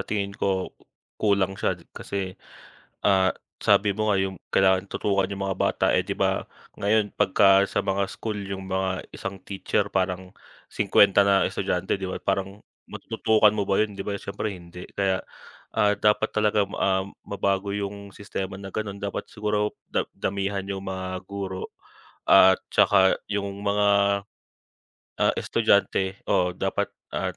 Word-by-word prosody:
tingin 100 -2 -2
ko 95 -2 -1 0.5
kulang 100 -2 +1
siya - - +1
d - - -19
kasi, 95 -2 -4 0.7
ah, 95 -2 +3 0.3
sabi 100 -1 +4
mo 110 0 +1
nga 100 - +2
yung 95 0 -1 0.2
kailangan 95 0 +3
tutukan 100 -2 +1
'yong 100 - -5
mga 95 -1 -1
bata, - - +1
eh, - - +2
'di - - -5
ba, - - +1 0.3
ngayon 105 0 +1
pagka 95 0 +5
sa - - -1
mga 100 0 -1
school 110 -2 -4
yung 95 -1 -6
mga 95 -1 -2
isang 95 - -6
teacher 100 +1 -1
parang 95 0 -2 0.3
50 100 0 +4
na 100 -1 +3
estudyante, - - -1
'di 95 - -8
ba? - - -4
Parang 95 +1 -2 0.3
matutukan 110 -1 +2
mo 100 - 0
ba 95 +1 +1
'yon, 105 -2 0
'di 95 - -5
ba? 100 0 -3
Siyempre, 100 +2 -4
hindi. 90 -1 -10
Kaya, 95 -1 0 0.5
ah, 105 0 +2
dapat 105 +2 +1
talaga, 105 -1 +2
um, 95 0 -1
mabago 100 0 -1
'yong 100 0 -5
sistema 95 -1 -6
na 95 - -7
ganun. 100 0 -4
Dapat 100 -1 -5
siguro 105 0 -1 0.2
da - - 0
damihan 100 0 -2
'yong 95 -1 -4
mga 95 -1 -5
guro. 95 -1 -5 0.6
At 95 0 +7
tsaka 95 0 +5 0.2
'yong 100 -1 -3
mga, 100 0 +2 1.3
ah, - - +4
estudyante 100 -3 +1
oo, 90 0 +2
dapat - - -1 0.2
at - - -2
100 Hz, 150 wpm, -25 LUFS, 95-100 Hz, 1.3 s, At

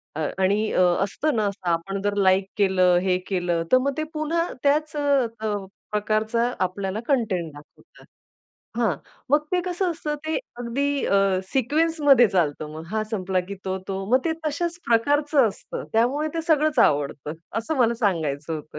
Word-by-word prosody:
अ, 155 -1 -1
आणि 205 +3 +2
अ, - - +2 0.2
असतं 280 +8 -1
ना 215 - +1
असं 195 -3 -4
आपण 195 +4 -2
जर 205 0 -1
लाइक 190 0 +3
केलं, 185 -3 +4
हे 185 -1 +1
केलं, 175 -3 0
तर 255 - +7
मग 275 +2 0
ते 310 - 0
पुन्हा 325 +3 0 0.2
त्याच 300 +2 +1
अ, 240 -7 0 0.4
प्रकारचा 215 +3 0
आपल्याला 190 +2 -2
कंटेंट 205 - 0
दाखवतात. 145 0 -17 0.7
हां, 230 -7 +2 0.4
मग 295 +1 +3
ते 360 - +3
कसं 360 0 -1
असतं, 310 -2 -3
ते 315 - 0 0.2
अगदी 275 +4 -1
अ, 195 -1 +2
सिक्वेन्समध्ये 290 -1 +4
चालतं 155 -5 0
मग 160 +1 -8
हा 215 0 0
संपला 190 -3 0
की 200 - -4
तो, 190 0 -2
तो 195 0 -3
मग 255 - +6
ते 330 - +1
तश्याच 340 +3 -2
प्रकारचं 285 +3 +3
असतं. 200 - -7
त्यामुळे 260 +7 +2
ते 330 - -1
सगळंच 310 -3 +2
आवडतं 145 - +2 0.3
असं 265 +8 -3
मला 235 -2 +3
सांगायचं 165 - -1
होतं. 150 0 -8
220 Hz, 165 wpm, -24 LUFS, 190-290 Hz, 0.7 s, तर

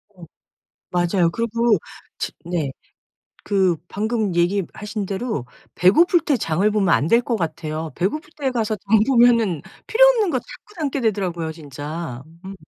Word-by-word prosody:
어 175 -2 -12 0.7
맞아요. 175 0 +2
그리고 230 +1 +1 0.4
집 - - -4
네. 165 -5 -2 0.7
그 190 -4 +2
방금 215 -2 -1
얘기하신 200 +4 -1
대로 195 - -3 0.4
배고플 335 - +6
때 305 -4 +1
장을 190 -1 +1
보면 200 -4 +3
안 145 - +1
될 230 +6 +5
것 235 -1 -1
같아요. 160 -3 -4
배고플 300 - -2
때 275 -3 0
가서 220 -3 -1
장 205 +2 +2
보면은 235 - +4 0.3
필요 - - +6
없는 450 -7 +3
것 265 - +1
자꾸 420 - -15
담게 285 -3 -1
되더라고요 185 -8 -1
진짜. 145 -2 -7 0.2
음. 195 +1 -7
200 Hz, 280 characters per minute, -21 LUFS, 170-235 Hz, 0.7 s, 배고플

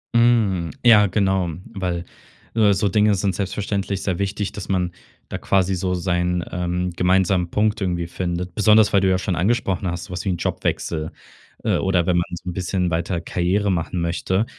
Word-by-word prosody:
Hm. 110 -8 +3 0.2
Ja, 105 -3 +7
genau. 95 -3 +1 0.2
Weil, 90 -4 -3 0.5
äh, 105 -3 +4
so 100 +2 +1
Dinge 105 +1 +3
sind 95 0 0
selbstverständlich 100 0 -2
sehr 90 -3 -1
wichtig, 100 0 -2
dass 105 - -8
man 90 -2 0 0.4
da - - -4
quasi 95 -1 +1
so 90 0 -1
seinen, 90 -1 0
ähm, 90 +1 -2
gemeinsamen 90 0 +2
Punkt 105 +3 0
irgendwie 90 -3 -1
findet. 90 +1 -4
Besonders, 105 0 +4
weil 100 - +5
du 95 - +3
ja 95 - +3
schon 95 0 -2
angesprochen 100 0 0
hast, 85 -1 -3
so - - -13
was 90 - -4
wie - - 0
'n 90 - 0
Jobwechsel, 80 -1 -2 0.5
äh, - - +2
oder 90 -3 +1
wenn 90 -1 +2
man 85 - +1
so 90 +1 -7
'n - - -4
bisschen 90 0 -1
weiter 85 +1 -1
Karriere 95 +4 0
machen 85 0 -2
möchte, 95 +4 0
95 Hz, 185 wpm, -22 LUFS, 90-100 Hz, 0.5 s, Ja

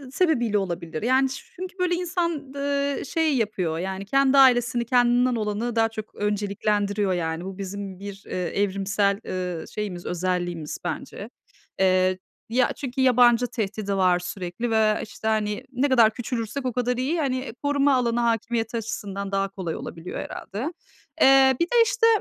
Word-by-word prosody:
sebebiyle 240 - +2
olabilir. 170 -4 -3
Yani 260 +3 +3
ç 265 - -7
çünkü 370 +2 -7
böyle 360 -1 +2
insan, 340 -5 -2
ııı, 280 0 -1
şey 320 0 +1
yapıyor, 185 -8 -1
yani 190 +2 -4
kendi 275 +5 +3
ailesini, 245 -3 +5
kendinden 245 +1 +3
olanı 215 +2 -2
daha 225 0 +3
çok 220 -1 -8
önceliklendiriyor. 205 -1 0
Yani 165 0 -2
bu 190 -1 -7
bizim 195 -1 -6
bir, 200 0 -8
eee, - - -8
evrimsel, 200 +2 0
ııı, 180 -3 -4
şeyimiz, 195 -5 -5
özelliğimiz 175 -3 -2
bence. - - -5 0.5
Eee, 185 0 +3 0.3
ya 245 +2 +2
çünkü 265 -2 -3
yabancı 245 -1 +5
tehdidi 205 -3 -3
var 180 -2 +3
sürekli 180 +5 -4
ve 215 -1 +3
işte 220 0 -7
hani 210 -1 0
ne 270 +3 +1
kadar 235 -4 +5
küçülürsek 245 +2 -4
o 250 - -1
kadar 250 0 0
iyi. 280 +7 0
Hani 260 -4 -2
koruma 285 -1 +3
alanı 240 -2 +1
hakimiyeti 230 0 0
açısından 200 -3 -4
daha 195 0 0
kolay 185 -4 -5
olabiliyor 165 +2 -7
herhâlde. 250 - -5 0.5
Eee, 265 0 +7
bir 340 - +3
de 470 +6 +3
işte, 455 +1 +2
220 Hz, 155 wpm, -24 LUFS, 195-260 Hz, 0.5 s, Eee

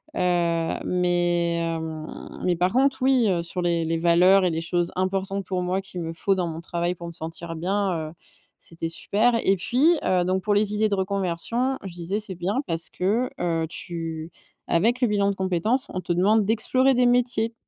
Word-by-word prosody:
Heu, 170 -2 +1
mais, 175 -1 +1
hem, 160 -2 -4 0.2
mais 180 -1 +2
par 180 +2 +1
contre 270 +2 +3
oui, 260 -3 +4
heu, 175 -3 0
sur 175 +2 -3
les 170 -1 +1
les 165 +1 0
valeurs 180 +3 +5
et - - +3
les 160 0 -2
choses 175 +1 0
importantes 195 +1 -2
pour 185 -1 -2
moi 185 +2 -1
qu'il 185 -2 -7
me 165 0 -4
faut 195 +4 0
dans 180 -2 -1
mon 165 0 -6
travail 175 +1 -2
pour 170 0 -8
me - - -6
sentir 165 +1 -7
bien, 195 +4 0 0.2
heu, - - -13 0.5
c'était 165 0 -6
super 220 +8 +1
et 195 - +4
puis, 250 - +1 0.2
heu, 180 -1 +2
donc 185 +1 0
pour 210 - +1
les 205 0 +2
idées 215 +1 +2
de 200 - +1
reconversion, 200 +7 -1
je 190 -3 -6
disais 175 +4 -2
c'est 200 -3 -7
bien 190 +9 -1
parce 165 -1 0
que 215 +8 0
heu, 165 -2 0
tu 165 -2 -5 0.4
avec 230 +9 +2
le 245 - +4
bilan 200 -1 +2
de - - -5
compétences, 190 +8 0
on 185 - -2
te 175 0 -1
demande 205 +5 +3
d'explorer 255 +5 +3
des 250 0 +3
métiers. 245 -2 +1
180 Hz, 200 wpm, -24 LUFS, 170-205 Hz, 0.5 s, valeurs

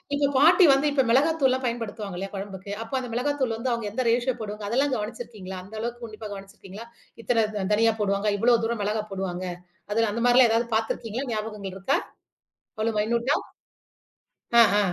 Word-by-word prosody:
இப்ப 285 -1 +2
பாட்டி 340 +5 +7
வந்து 275 +2 +2
இப்ப 270 -2 +3
மிளகாத்தூள்லாம் 265 0 +3
பயன்படுத்துவாங்க 220 -5 -4
இல்லையா 195 +2 -5
குழம்புக்கு? 195 0 -7
அப்போ 225 +4 -12
அந்த 250 -2 -6
மிளகாத்தூள் 260 -1 0
வந்து 245 +2 -2
அவங்க 235 -2 -2
எந்த 255 +4 -1
ரேஷியோ 245 +2 +2
போடுவாங்க 210 -1 -6
அதெல்லாம் 270 +4 +1
கவனிச்சிருக்கீங்களா? 210 -4 -6
அந்த 210 +4 -12
அளவுக்கு 240 +1 -4
உன்னிப்பா 215 -1 -9
கவனிச்சிருக்கீங்களா? 195 +2 -10 0.4
இத்தன 225 -3 +2 0.3
தனியா 225 +1 +4
போடுவாங்க, 200 +1 +1
இவ்வளவு 230 +2 +3
தூரம் 230 -1 -2
மிளகாய் 210 +1 -2
போடுவாங்க, 185 -1 -3 0.5
அதெல்லாம் 225 -1 +1
அந்த 230 +2 -2
மாரிலாம் 245 0 +6
ஏதாவது 230 +1 +1
பாத்திருக்கீங்களா? 225 +3 -2
ஞாபகங்கள் 210 -3 -5
இருக்கா? 195 +9 +1 0.8
அவ்வளவு 220 0 -1
மைனூட்டா? 235 +6 +1 1.2
ஆ, - - +11
ஹ. - - +4
225 Hz, 160 wpm, -25 LUFS, 210-245 Hz, 1.2 s, ஆ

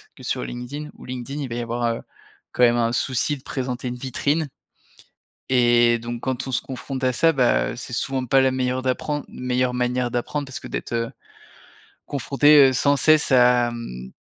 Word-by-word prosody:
que - - -15
sur - - -2
LinkedIn, 140 +5 -6
où - - -14
LinkedIn 130 +3 -5
il 135 - -4
va 115 - -4
y 120 - -2
avoir, 120 +1 -3
heu, - - -8 0.5
quand 125 - +1
même 120 0 +5
un 115 -1 +1
souci 130 +4 0
de 130 - -18
présenter 125 -1 -4
une 125 - -4
vitrine 140 +4 -1 1.0
et 120 -2 +4
donc 120 0 -6
quand 130 0 -3
on - - -4
se - - +1
confronte 130 0 -6
à 130 - +3
ça, 165 +6 +3
bah, 125 -4 +2
heu, - - -7
c'est 120 0 -8
souvent 130 +2 -2
pas 135 +2 +4
la 130 - +3
meilleure 130 0 -1
d'apprendre 145 +3 -2
meilleure 125 0 -1
manière 125 0 -1
d'apprendre 140 +4 -2
parce 130 -1 -7
que - - -8
d'être, - - -5
heu, 115 0 -1 1.0
confronté, 140 +1 +5
heu, 130 - -2
sans 140 +2 +3
cesse 155 -2 +4
à, 125 -1 +5
hem, 65 - -8
125 Hz, 200 wpm, -23 LUFS, 120-135 Hz, 1.0 s, même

